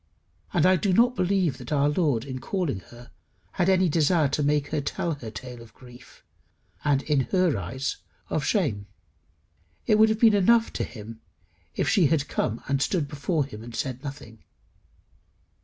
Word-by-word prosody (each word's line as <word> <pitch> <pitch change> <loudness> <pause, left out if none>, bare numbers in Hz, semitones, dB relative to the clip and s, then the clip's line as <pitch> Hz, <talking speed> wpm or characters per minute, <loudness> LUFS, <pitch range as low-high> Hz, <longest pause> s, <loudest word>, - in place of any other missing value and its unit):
And 175 -2 +2
I 185 0 +5
do 195 0 0
not 245 +5 +4
believe 180 - 0
that 125 +1 -9
our 145 -1 +3
Lord 145 -6 +1
in 130 -2 -6
calling 165 - -2
her 120 0 -14 0.4
had 180 0 0
any 185 -1 +4
desire 155 -1 +2
to 145 - -1
make 145 0 +1
her 150 -2 -1
tell 165 +4 -2
her 125 -6 -8
tale 120 +2 -9
of 115 -2 -16
grief, 125 -1 -16 0.6
and, 140 -2 +2
in 150 -2 +1
her 180 -6 +2
eyes, 115 +8 -4 0.3
of 155 - -2
shame. 125 - 0 1.0
It 215 - +3
would 220 0 +6
have 220 0 0
been 225 -2 +6
enough 225 +4 +3
to - - -2
him 115 -1 -9 0.5
if - - -1
she 190 -8 +4
had 145 -1 0
come 115 -3 -2
and 135 0 0
stood 155 0 0
before 145 +1 -1
him, 110 -6 -10
and 115 +1 -9
said 130 -1 -4
nothing. 125 -6 -9
145 Hz, 175 wpm, -26 LUFS, 125-180 Hz, 1.0 s, would